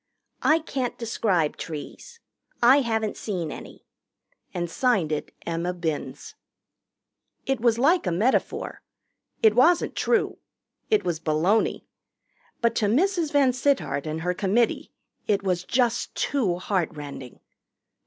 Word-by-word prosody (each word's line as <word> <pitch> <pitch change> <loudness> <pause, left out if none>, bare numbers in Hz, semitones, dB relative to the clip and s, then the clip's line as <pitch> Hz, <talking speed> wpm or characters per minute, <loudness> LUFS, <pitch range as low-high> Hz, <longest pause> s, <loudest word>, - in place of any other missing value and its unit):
"I 310 - +4
can't 270 -6 -3
describe 195 -9 0
trees. 165 - -8 0.4
I 250 +3 +6
haven't 220 -3 -1
seen 180 -7 -3
any." - - -10 0.7
And 175 -1 -3
signed 190 - +1
it 150 - -3
Emma 170 +2 -2
Binns. 165 -4 -4 1.1
It 270 -4 -1
was 235 -1 +3
like 300 - +3
a - - +1
metaphor. 215 +10 0 0.6
It 220 -1 +6
wasn't 330 +9 +3
true. 470 - +1 0.5
It 430 -1 +3
was 170 -3 -1
baloney. 165 +8 +1 0.8
But 235 -1 +2
to 210 - +2
Mrs. 335 - +1
VanSittart 265 - +1
and 155 +1 -3
her 180 +2 0
committee 205 +6 0 0.4
it 200 -2 +1
was 180 -2 0
just 240 +2 0
too 215 -12 0
heart 180 -2 -1
rending. 140 -4 -9
215 Hz, 125 wpm, -25 LUFS, 175-255 Hz, 1.1 s, I